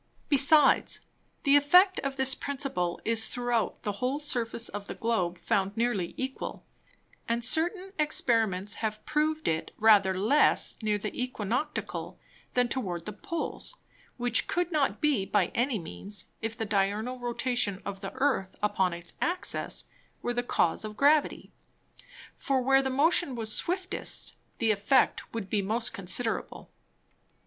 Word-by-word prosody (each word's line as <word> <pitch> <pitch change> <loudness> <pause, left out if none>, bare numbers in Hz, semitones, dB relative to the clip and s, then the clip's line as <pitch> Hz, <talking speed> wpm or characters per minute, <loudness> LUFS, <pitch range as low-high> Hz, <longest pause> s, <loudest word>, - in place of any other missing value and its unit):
Besides, 285 +1 +4 0.4
the 280 -2 +5
Effect 360 +7 +5
of 275 -1 -3
this 265 0 +2
Principle 265 -13 -3
is 225 0 +3
throughout 245 -2 -2
the 205 - -1
whole 255 +3 0
Surface 235 -5 -1
of 205 0 -7
the - - -6
Globe 185 -7 -1
found 195 +3 -1
nearly 225 -7 -1
equal; 265 0 -5 0.6
and 235 0 +3
certain 360 - +2
Experiments 225 -9 +1
have 215 -1 -3
proved 310 +1 0
it 160 0 -1
rather 210 -3 +5
less 220 +11 +3
near 210 -1 +1
the 210 +1 -4
Æquinoctial, 250 +3 -3 0.4
than 250 -1 +3
towards 185 -10 -3
the 210 - -5
Poles; 335 - -4 0.4
which 245 0 +1
could 355 0 -1
not 300 -4 0
be 290 -10 +2
by 195 -2 +1
any 245 0 +1
means, 175 - -4 0.2
if 225 0 -4
the 225 - -2
Diurnal 210 +5 -1
Rotation 240 -4 -1
of 195 -1 -6
the 195 - -5
Earth 260 -8 0
upon 190 -3 +1
its 170 0 -5
Axis 360 +1 -1 0.4
were 240 - -1
the 245 - 0
Cause 180 -8 0
of 215 0 -7
Gravity; 295 +2 +2 0.8
for 270 -1 0
where 270 +1 +5
the 265 - -1
Motion 285 +1 +3
was 220 -2 -1
swiftest, 365 +1 -1 0.2
the 225 -2 +2
Effect 215 +6 +2
would 225 -4 -5
be 205 +1 0
most 225 +4 0
considerable. 200 +5 -3
235 Hz, 145 wpm, -28 LUFS, 205-275 Hz, 0.8 s, the